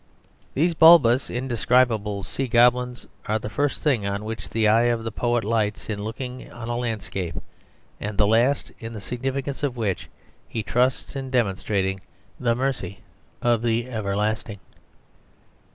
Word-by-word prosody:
These 170 +5 +2
bulbous, 155 -7 +6
indescribable 120 -4 +1
sea 135 +6 -3
goblins 125 +1 +3 0.2
are 110 0 +1
the 110 0 -6
first 145 -1 -1
thing 125 -10 +2
on 100 +1 -3
which 110 -2 -5
the 110 -1 +2
eye 115 +3 +5
of 115 -1 0
the 115 - -3
poet 120 +1 0
lights 110 -1 -1
in 105 -1 -3
looking 125 +3 -6
on 120 0 -7
a 120 - -1
landscape, 105 -7 -3 0.6
and 105 -1 -4
the 105 - +4
last 120 +6 +2
in 115 -1 -7
the 110 - -6
significance 135 +5 -3
of 135 -4 -1
which 100 -6 -2 0.4
he 110 - -3
trusts 125 +6 0
in 135 -1 -4
demonstrating 95 -5 0 0.4
the 120 -2 +1
mercy 125 -7 -3 0.4
of 120 -2 +3
the 115 +1 0
Everlasting. 105 0 -2
115 Hz, 150 wpm, -24 LUFS, 105-125 Hz, 0.6 s, bulbous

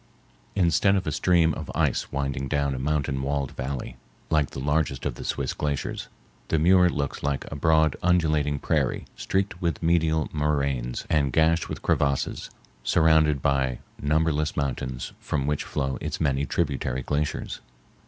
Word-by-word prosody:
Instead 95 +1 +3
of 95 - 0
a 75 - -1
stream 85 -1 +3
of - - -6
ice - - 0
winding 70 -1 -2
down 70 0 0
a 65 - -4
mountain 70 -1 0
walled 70 0 -1
valley 65 0 -5 0.3
like 75 -3 +3
the - - -7
largest 75 -1 0
of - - -1
the - - -8
Swiss - - -2
glaciers, 70 -2 -3 0.4
the 80 - +1
Muir 90 +3 +5
looks 70 -4 -3
like 70 -1 -1
a - - -4
broad 80 0 +3
undulating 75 -5 +2
prairie - - 0
streaked 95 -1 -2
with 85 -1 -1
medial 80 -2 +2
moraines 70 -5 -1
and 70 -4 +2
gashed 80 +5 +2
with - - -6
crevasses, 70 -2 0 0.3
surrounded 80 -1 +3
by 65 -3 +1 0.2
numberless 75 0 +1
mountains 65 -3 -3
from 70 -3 -2
which 75 0 0
flow 65 -1 -2
its - - -3
many 70 -1 +1
tributary 70 -5 -1
glaciers. 75 +2 -2
75 Hz, 155 wpm, -26 LUFS, 70-80 Hz, 0.4 s, Muir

